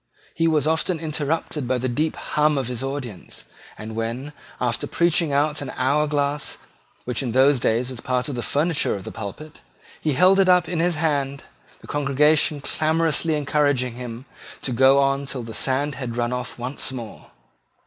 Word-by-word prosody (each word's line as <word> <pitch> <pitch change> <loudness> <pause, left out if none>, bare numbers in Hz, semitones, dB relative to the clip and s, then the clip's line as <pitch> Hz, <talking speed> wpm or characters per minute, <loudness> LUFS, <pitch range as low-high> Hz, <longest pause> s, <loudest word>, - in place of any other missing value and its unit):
He 165 +1 +1
was 155 -3 +2
often 160 +2 +1
interrupted 155 -2 -2
by 130 0 +1
the 125 +1 -2
deep 150 +6 -1
hum 150 0 +1
of 130 -3 -1
his 125 -1 -3
audience; 135 -8 -5 0.3
and 110 +1 -7
when, 120 +6 -4 0.3
after 120 -1 -1
preaching 170 -2 +2
out 150 +2 +1
the 140 -3 -5
hour 145 +4 +2
glass, 145 0 -1 0.5
which 125 -2 -2
in 125 -4 -3
those 135 +1 +5
days 120 +3 0
was 120 -3 -7
part 125 +1 -1
of 145 - -3
the 120 - -3
furniture 150 +1 +1
of 100 - -7
the - - -7
pulpit, 145 +10 -8 0.4
he 155 - +1
held 185 +7 +5
it 190 -1 +4
up 180 -1 +5
in 175 - -2
his 175 0 +2
hand, 140 -3 -1 0.4
the - - -13
congregation 145 +1 +2
clamorously 160 +1 +1
encouraged 145 -2 +2
him 120 0 -6 0.4
to 130 - -1
go 130 +3 +5
on 140 0 +2
till 130 -3 -4
the 115 0 -8
sand 135 +6 +1
had 125 -3 -5
run 120 0 0
off 125 0 -4
once 130 +2 -3
more. 120 -5 -8
140 Hz, 180 wpm, -23 LUFS, 125-150 Hz, 0.5 s, those